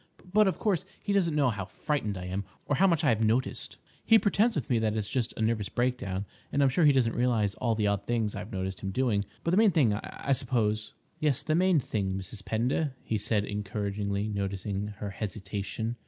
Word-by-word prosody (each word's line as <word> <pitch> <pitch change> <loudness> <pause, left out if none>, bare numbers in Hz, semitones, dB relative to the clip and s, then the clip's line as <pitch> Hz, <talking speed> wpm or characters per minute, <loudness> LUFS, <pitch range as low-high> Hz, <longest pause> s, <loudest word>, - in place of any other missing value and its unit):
But, 210 -1 +6
of 190 - 0
course, 190 -5 +1 0.2
he 205 - 0
doesn't 175 -6 +2
know 140 -4 +3
how 100 -3 -4
frightened 105 -4 -2
I 90 - -6
am, 95 +2 -3 0.2
or 145 - 0
how 195 - +5
much 170 -3 +2
I 150 - +4
have 115 -1 +2
noticed. 115 +4 0 0.3
He 225 - +7
pretends 220 +2 +2
with 145 -8 -2
me 120 -3 +2
that 110 -1 0
it's 105 -2 -1
just 125 -4 0
a 110 - 0
nervous 110 -3 0
breakdown, 120 -6 -1 0.3
and 140 - +2
I'm 135 - +5
sure 155 +5 +3
he 145 - +8
doesn't 125 -4 +2
realise 115 -5 +1
all 115 +1 0
the 105 -1 0
odd 100 -1 0
things 115 -3 0
I've 100 +2 -6
noticed 95 0 -3
him 95 - -4
doing. 105 -2 +1 0.2
But 165 - 0
the 180 - +3
main 220 0 +6
thing, 140 - +3
I 110 +6 -4
suppose—" 110 -5 0 0.3
"Yes, 150 -4 +1
the 155 - 0
main 180 0 +4
thing, 100 -6 -2
Mrs. 95 +2 -7
Pender," 130 +7 0
he 110 - -1
said, 105 0 0
encouragingly, 100 0 -2
noticing 100 0 -2
her 100 -1 -4
hesitation. 105 +3 -4
110 Hz, 215 wpm, -29 LUFS, 100-140 Hz, 0.3 s, he